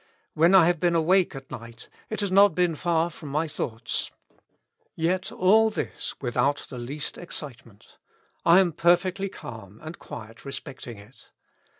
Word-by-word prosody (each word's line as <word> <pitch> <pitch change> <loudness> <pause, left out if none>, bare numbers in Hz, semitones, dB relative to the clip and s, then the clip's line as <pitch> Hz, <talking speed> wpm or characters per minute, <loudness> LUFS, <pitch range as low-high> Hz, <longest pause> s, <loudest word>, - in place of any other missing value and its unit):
When 170 +5 +5
I 180 -3 +8
have 175 -1 +2
been 175 0 +2
awake 175 +1 +3
at 135 0 -10
night, 115 0 -9 0.2
it 215 - -2
has 200 -2 -1
not 200 -2 +6
been 180 -2 +2
far 170 +1 0
from 155 -2 -10
my 155 +4 0
thoughts. 120 -6 -3 0.9
Yet 180 +3 -1
all 220 +4 +4
this 215 - -5
without 135 +3 0
the 125 - -6
least 140 +5 -5
excitement. 135 - -10 0.4
I 170 +2 +7
am 180 -3 +1
perfectly 175 +4 +2
calm 110 - -10
and 160 +2 -8
quiet 115 -1 -10
respecting 135 -4 -8
it. 105 +6 -17
160 Hz, 155 wpm, -26 LUFS, 125-180 Hz, 0.9 s, I